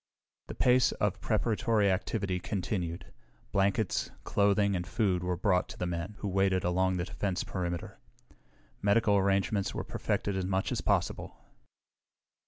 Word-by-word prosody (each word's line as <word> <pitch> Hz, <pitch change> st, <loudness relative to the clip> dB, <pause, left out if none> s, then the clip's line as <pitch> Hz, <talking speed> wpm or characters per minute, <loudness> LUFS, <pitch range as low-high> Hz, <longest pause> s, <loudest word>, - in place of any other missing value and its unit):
The -, -, -7 dB
pace 125 Hz, 0 st, +4 dB
of -, -, -1 dB
preparatory 110 Hz, -3 st, +2 dB
activity 95 Hz, -1 st, -1 dB
continued. 90 Hz, -2 st, -3 dB, 0.4 s
Blankets, 100 Hz, +1 st, +1 dB
clothing 100 Hz, 0 st, +2 dB
and 90 Hz, -1 st, -3 dB
food 90 Hz, -2 st, 0 dB
were 90 Hz, -1 st, -1 dB
brought 90 Hz, -1 st, +1 dB
to -, -, -9 dB
the 90 Hz, -, -2 dB
men 85 Hz, +4 st, -4 dB
who 105 Hz, -, -2 dB
waited 95 Hz, -1 st, +2 dB
along 95 Hz, +1 st, +1 dB
the 85 Hz, -, -1 dB
defense 95 Hz, -1 st, -2 dB
perimeter. 85 Hz, -2 st, -4 dB, 0.8 s
Medical 105 Hz, 0 st, +3 dB
arrangements 100 Hz, +1 st, +1 dB
were -, -, -2 dB
perfected 100 Hz, -, -2 dB
as 95 Hz, -1 st, -1 dB
much 95 Hz, 0 st, 0 dB
as -, -, -1 dB
possible. -, -, -1 dB
95 Hz, 140 wpm, -30 LUFS, 90-100 Hz, 0.8 s, pace